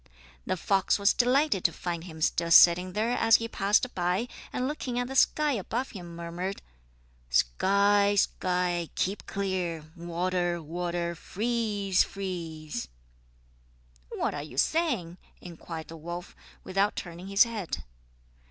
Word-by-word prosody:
The 185 - 0
fox 195 +2 +2
was 200 0 +3
delighted 255 - +2
to 170 - +3
find 170 +1 -4
him 160 -3 -10
still 170 +1 +1
sitting 175 +2 +7
there 220 +4 0
as 225 -2 +5
he 230 - +1
passed 210 +4 +1
by, 180 +6 0 0.2
and 255 - -1
looking 265 -4 -3
at 245 0 0
the 265 - -6
sky 300 +2 +3
above 240 +2 -2
him 175 -5 -9
murmured: 170 +3 -5 0.7
"Sky, 200 - +3
sky, 180 -3 0
keep 195 +2 -2
clear! 175 -5 -3
Water, 175 0 -1
water, 170 +1 -3
freeze, 210 -1 0
freeze!" 165 -8 -5 1.2
"What - - -2
are 145 - -4
you 145 -3 -10
saying?" 235 - +1 0.2
inquired 165 -2 -8
the 165 - -8
wolf, 175 +2 -7 0.3
without 195 +2 +1
turning 175 +1 -7
his 195 0 +6
head. 225 -7 -4
185 Hz, 135 wpm, -28 LUFS, 170-210 Hz, 1.2 s, sitting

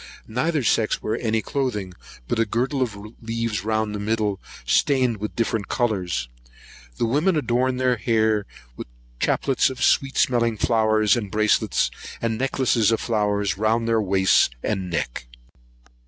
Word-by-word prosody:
Neither 145 +6 0
sex 110 -1 +1
wear 110 - -1
any 110 -2 0
cloathing 105 -10 -2 0.3
but - - -1
a 115 - +3
girdle 130 +6 -1
of 115 -5 -1 0.2
leaves 115 -2 -2
round 110 -1 -1
their 105 - -4
middle, 105 -2 -1 0.3
stained 125 - +2
with 105 +1 -5
different 115 -2 -1
colours. 95 - -1 0.7
The - - +1
women 150 +10 +2
adorn 125 -1 0
their 125 -1 +1
hair 110 -2 +1 0.3
with - - -8 0.3
chaplets 135 -1 +1
of 130 - -5
sweet 135 0 +2
smelling 115 -3 +2
flowers 110 -1 +3
and 110 -5 -3
bracelets, 105 - +1 0.3
and 115 -1 -2
necklaces 130 -4 +2
of 115 - +1
flowers 105 -3 0
round 115 +2 +1
their 115 -1 +2
wrists 95 -1 +3
and 95 -4 -2
neck. 60 -7 -3
110 Hz, 145 wpm, -23 LUFS, 105-125 Hz, 0.7 s, a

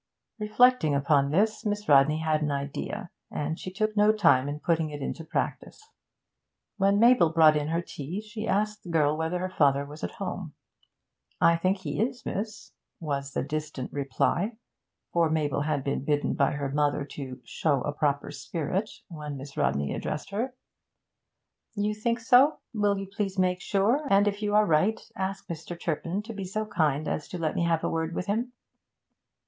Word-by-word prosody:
Reflecting 215 - +4
upon 140 0 +3
this, 215 +8 +1
Miss 210 -1 -2
Rodney 145 +1 +5
had 155 -1 +1
an 150 - 0
idea, 145 +8 -4 0.2
and 155 +2 -3
she - - -5
took 215 +2 -1
no 210 0 +5
time 145 -11 +3
in 145 +1 -4
putting 165 -1 +1
it 145 -1 -6
into 155 +4 -4
practice. 435 - -4 0.9
When 200 0 +3
Mabel 235 -7 +6
brought 160 -1 +6
in 150 -1 0
her 165 +2 -1
tea, 160 +4 -6
she 215 +1 -6
asked 210 +2 0
the 175 - -11
girl 155 -3 +2
whether 160 +3 -1
her 185 +1 -3
father 140 -1 +3
was 150 +2 -11
at - - -3
home. - - -5 0.8
'I 170 - +5
think 185 +4 +1
he 190 +1 -3
is, 245 +2 -2
miss,' 215 +2 -4 0.3
was 140 -3 -3
the - - -1
distant 150 -2 -4
reply 165 - 0 0.6
for 170 -2 +3
Mabel 150 -3 0
had 145 -2 -1
been 140 -1 -2
bidden 145 0 +1
by 140 - +2
her 140 -1 -2
mother 145 0 +1
to 135 -2 -7
'show 140 +3 0
a 145 - -2
proper 145 -1 0
spirit' 160 +8 -3 0.2
when 150 -5 -6
Miss 135 +1 -9
Rodney 70 0 0
addressed 150 - -4
her. 245 +6 -2 1.2
'You 205 0 0
think 230 +3 -1
so? 250 +6 +5 0.2
Will 205 -2 +2
you 195 - -4
please 195 0 -3
make 180 -1 +1
sure, 215 +9 +2
and, 200 +1 +5
if 205 0 -1
you 210 0 0
are 210 0 +6
right, 190 +6 +2 0.2
ask 195 +1 -3
Mr. 170 +1 -6
Turpin 170 +5 -2
to 225 +2 -7
be 200 -2 -5
so 215 +4 -2
kind 155 -8 0
as 150 - -2
to 180 - -6
let 160 -2 -1
me - - 0
have 165 -1 +1
a - - +1
word 165 0 -2
with - - -2
him.' 235 +5 -1
170 Hz, 185 wpm, -27 LUFS, 150-210 Hz, 1.2 s, Mabel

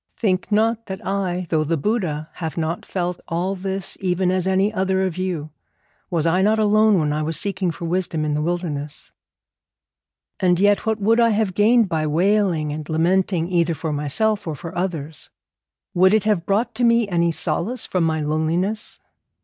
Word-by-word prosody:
Think 190 -2 0
not 225 +2 +1
that 190 -1 -7
I, 185 -2 -1
though 155 -2 +2
the 165 +2 0
Buddha, 160 -4 -2
have 160 -2 -5
not 165 +1 -3
felt 180 -1 -3
all 175 +3 -1
this 190 0 -4
even 185 -1 0
as 185 0 0
any 190 +3 +2
other 190 -1 +1
of 185 -3 -3
you; 175 -5 -3 0.6
was 165 -3 0
I 175 +3 +2
not 215 +3 +3
alone 215 -1 +4
when 150 -3 +1
I 155 - -1
was 160 +1 0
seeking 190 -2 -1
for 165 +1 -5
wisdom 170 -2 -1
in 150 - -1
the 150 - 0
wilderness? 155 -4 -4 1.3
'And 180 -2 +2
yet 205 +2 +3
what 220 0 +1
would 225 +3 +3
I 230 -1 +5
have 215 -3 0
gained 220 +3 +4
by 155 -3 -1
wailing 175 -1 +1
and 150 0 -7
lamenting 170 +1 +1
either 170 -2 +1
for 155 +1 -3
myself 180 +9 0
or 155 - -3
for 165 +5 -8
others? 160 -4 -4 0.6
Would 185 +3 +5
it 215 - +2
have 210 -6 0
brought 205 +5 +1
to 245 - -2
me 235 -2 +4
any 170 -3 +1
solace 175 +10 -2
from 180 -2 0
my 160 -1 0
loneliness? 165 +8 -1
180 Hz, 180 wpm, -21 LUFS, 160-205 Hz, 1.3 s, I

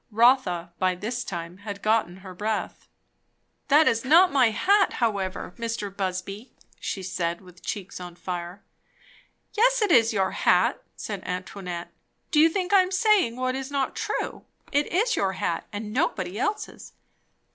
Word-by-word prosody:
Rotha 210 -7 +3
by 185 -1 +2
this 235 +7 -4
time 170 -3 -6
had 200 0 -8
got 220 -3 +2
her 185 +1 -11
breath. 210 +3 -3 0.8
"That 300 +2 +5
is 230 0 +2
not 340 +7 +6
my 255 -4 +4
hat 395 - +3
however, 200 -5 -2
Mr. 225 -4 -4
Busby," 195 +4 -4 0.2
she 190 - -4
said, 170 -2 -2
with 180 -2 -17
cheeks 195 -3 -5
on 175 -1 -8
fire. 175 +2 -6 0.9
"Yes, - - +3
it 410 - +1
is 230 -5 +5
your 190 -3 +1
hat," 180 0 +2
said 205 -3 -5
Antoinette. 180 -1 -5 0.4
"Do 305 - +3
you 320 +2 +7
think 365 +3 -2
I 390 - +8
am 365 - -1
saying 380 - +3
what 255 0 -1
is 265 0 -4
not 275 -2 -1
true? - - -3 0.3
It 290 0 +1
is 445 +6 +2
your 190 -1 0
hat, 170 -2 -2
and 210 0 -6
nobody 210 - -1
else's." 420 - -3
215 Hz, 155 wpm, -25 LUFS, 185-285 Hz, 0.9 s, I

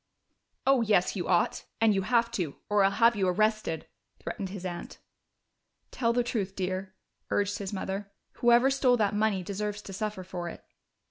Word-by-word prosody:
"Oh 270 -2 +5
yes, 210 -5 +2
you 180 -3 -3
ought! 175 -2 +1
And 225 -1 +4
you 195 - +1
have 235 +3 +2
to, 175 -11 -2
or 205 -1 +4
I'll 195 - +5
have 230 +3 +4
you 195 -2 +1
arrested," 215 -4 +1 0.3
threatened 195 -2 -5
his 190 -1 -7
aunt. 175 -1 -6 0.9
"Tell 230 -2 +1
the 245 +1 +2
truth, 200 -5 -2
dear," 190 0 -3 0.3
urged 205 0 0
his 195 -2 -4
mother. 195 0 -4 0.3
"Whoever 240 +2 +5
stole 260 -2 +3
that 210 -2 +1
money 210 -3 +1
deserves 210 +2 -4
to 195 - -8
suffer 210 -1 -3
for 175 -1 -5
it." - - -11
205 Hz, 175 wpm, -29 LUFS, 190-225 Hz, 0.9 s, Oh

